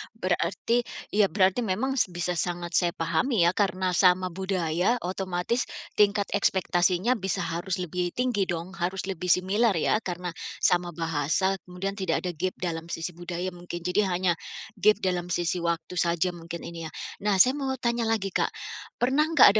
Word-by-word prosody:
berarti 185 +4 0 0.3
ya 205 -1 +4
berarti 190 +4 +2
memang 245 +5 0
s - - +3
bisa 175 0 -2
sangat 175 0 -2
saya 170 0 +2
pahami 170 +6 +1
ya 170 - +5
karena 185 -1 0
sama 180 0 +4
budaya 185 +2 0
otomatis 185 +5 -1 0.3
tingkat 205 0 +4
ekspektasinya 190 +3 +2
bisa 190 0 -1
harus 170 +3 -2
lebih 180 -1 -3
tinggi 240 -6 +1
dong 170 +1 -3
harus 185 +2 -1
lebih 180 -2 -4
similar 195 +5 +3
ya 170 +6 +2
karena 180 -3 -4 0.3
sama 175 -1 +2
bahasa. 165 +4 0
Kemudian 180 +2 -3
tidak 185 -4 0
ada 180 - -1
gap 180 +3 -2
dalam 165 -2 -4
sisi 165 0 -4
budaya 175 +1 -4
mungkin, 175 -1 -7
jadi 180 +3 +2
hanya 180 0 +1 0.5
gap 215 +2 +6
dalam 180 -2 0
sisi 175 0 0
waktu 170 +1 -2
saja 170 +1 +1
mungkin 170 0 -8
ini 165 -1 -6
ya. - - -11 0.3
Nah 205 0 +1
saya 250 +7 +7
mau 270 -2 -2
tanya 235 -2 0
lagi, 210 -4 0
Kak. - - +1 0.5
Pernah 270 +5 +2
nggak 215 -8 +8
180 Hz, 165 wpm, -27 LUFS, 175-200 Hz, 0.5 s, nggak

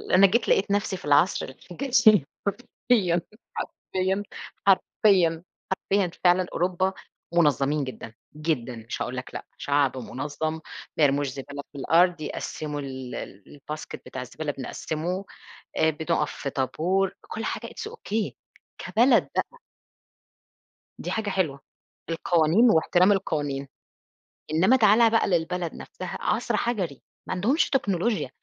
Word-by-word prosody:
أنا 195 +1 +8
جيت 225 +4 +1
لقيت 200 +1 +3
نفسي 200 -2 0
في - - -12
العصر 145 +5 +3
الحجري 215 - +3 0.2
حرفيًا، 200 -4 +1 0.4
حرفيًا، 190 +2 -2 0.4
حرفيًا، 185 -4 +4 0.3
حرفيًا 190 -1 0
فعلًا 180 0 +5
أوروبا 185 +2 +1 0.4
مُنظّمين 150 -3 +3
جدًا، 125 -3 -7 0.2
جدًا، 150 -6 -2
مش 115 0 -6
هاقول 130 +1 -3
لك 130 - -5
لأ - - -6
شعب 140 -2 +1
مُنظَّم، 145 +5 -3 0.4
ما 155 - +3
يرموش 145 0 +3
زبالة 140 +2 -7
في - - -11
الأرض، 170 +4 +3
يقسِّموا 150 0 -4
ال 130 -2 -6 0.4
الBasket 150 +2 -7
بتاع 130 - -6
الزبالة 145 +4 -4
بنقسّمه 160 +7 -4 0.5
آآ، 160 - +4
بنقف 160 -1 -1
في 140 - -4
طابور 180 +9 0
كل 445 +2 -6
حاجة - - -3
it's 435 0 -7
okay 220 - -2 0.5
كبلد 235 +2 +3
بقى. - - -2 1.4
دي - - -5
حاجة 215 -2 -1
حلوة، 160 -8 -1 0.5
القوانين 170 +7 +4
وإحترام 180 +3 +4
القوانين، 145 -8 -1 0.8
إنما 185 +11 +5
تعالَ 225 +1 +6
بقى 225 - +3
للبلد 175 -1 0
نفسها - - -7
عصر - - 0
حجري، 190 - -2 0.3
ما - - -1
عندهُمش 225 - +2
تكنولوجيا. 205 -4 0
170 Hz, 125 wpm, -26 LUFS, 145-200 Hz, 1.4 s, أنا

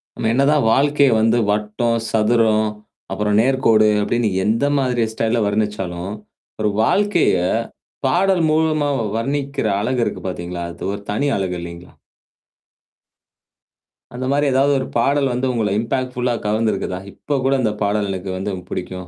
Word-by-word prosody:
நம்ம 110 - -1
என்னதான் 140 +1 +3
வாழ்க்கைய 140 0 +3
வந்து 115 +2 +3
வட்டம், 105 +3 0
சதுரம், 110 -1 +2 0.4
அப்புறம் 105 0 0
நேர்கோடு 115 -4 +3
அப்படின்னு 115 +1 0 0.2
எந்த 115 +6 +1
மாரி 125 -3 +1
ஸ்டைல்ல 115 +1 0
வர்ணிச்சாலும், 100 -4 -2 0.5
ஒரு 105 - +2
வாழ்க்கைய 200 - +2 0.7
பாடல் 180 +4 +2
மூலமா 155 -1 +1 0.3
வர்ணிக்கிற 140 +1 -2
அழகு 125 +4 0
இருக்கு - - -4
பாத்தீங்களா? 85 -1 -5
அது - - -11
ஒரு 100 - -6
தனி 125 +8 0
அழகு 95 -2 -2
இல்லைங்களா? 85 +1 -9 2.2
அந்த 130 +1 -4
மாரி 145 +1 +2
ஏதாவது 135 +2 +3
ஒரு 130 - -3
பாடல் 140 +3 +2
வந்து 125 +2 -1
உங்கள 110 -4 0
இம்பாக்ட்ஃபுல்லா 125 +1 -1
கவர்ந்திருக்குதா? 105 -3 -1
இப்ப 145 +7 -3
கூட 135 - +3
அந்த 110 -3 +1
பாடல் 105 0 0
எனக்கு 95 0 -5
வந்து 95 +2 -3 0.2
பிடிக்கும் 90 0 -5
115 Hz, 130 wpm, -20 LUFS, 105-135 Hz, 2.2 s, என்னதான்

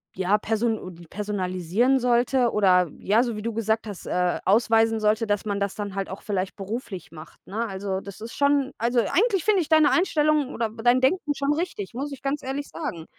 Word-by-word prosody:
ja, 190 +3 +2
person 215 -6 -2
personalisieren 205 +4 0
sollte 245 0 +2
oder, 180 -4 +3
ja, 220 +5 +3
so 235 -4 -3
wie 210 - -6
du 230 -1 -2
gesagt 220 0 0
hast, 200 -3 -8
äh, 180 0 0
ausweisen 225 +1 +3
sollte, 215 +1 +1
dass 205 0 0
man 200 -1 -2
das 200 -1 -1
dann 205 -2 -5
halt 195 -1 -3
auch 190 - -8
vielleicht 195 -2 -2
beruflich 200 -1 -6
macht, 155 -2 -12
ne? 225 +4 -2
Also, 190 -1 -3
das 200 0 -10
ist 230 - -7
schon 280 -1 +2
also 240 +1 +1
eigentlich 390 - +1
finde 415 -4 +4
ich 320 - -5
deine 315 -2 +5
Einstellung 305 -5 +2
oder 225 -2 -2
dein 245 +1 +5
Denken 295 +1 +1
schon 280 +1 0
richtig, 295 - -4
muss 280 +4 -4
ich 275 - -8
ganz 280 +1 -1
ehrlich 275 +2 -4
sagen. 175 - -5
225 Hz, 200 wpm, -25 LUFS, 200-270 Hz, -, deine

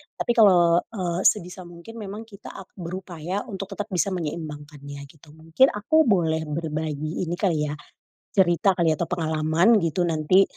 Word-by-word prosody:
tapi - - -1
kalo, 175 -5 +5
eee, 175 -2 -2
sebisa 180 -2 -1
mungkin 175 +7 -12
memang 210 +2 -7
kita 200 - -11
ap 195 - -10
berupaya 180 +1 -5
untuk 195 0 -5
tetep 205 +2 -5
bisa 185 +2 0
menyeimbangkannya 150 -3 -6
gitu 150 -1 -19
mungkin 165 +12 +3
aku 315 +10 +3
boleh 160 -5 +1
berbagi 155 +1 -3
ini 170 +2 -3
kali 160 -6 0
ya, 145 - -4 0.6
cerita 185 0 +3
kali 165 -2 +2
ya 155 - -2
atau 170 - -1
pengalaman 165 +5 +2
gitu 170 +1 0
nanti, 170 +3 +3
170 Hz, 160 wpm, -24 LUFS, 155-190 Hz, 0.6 s, kalo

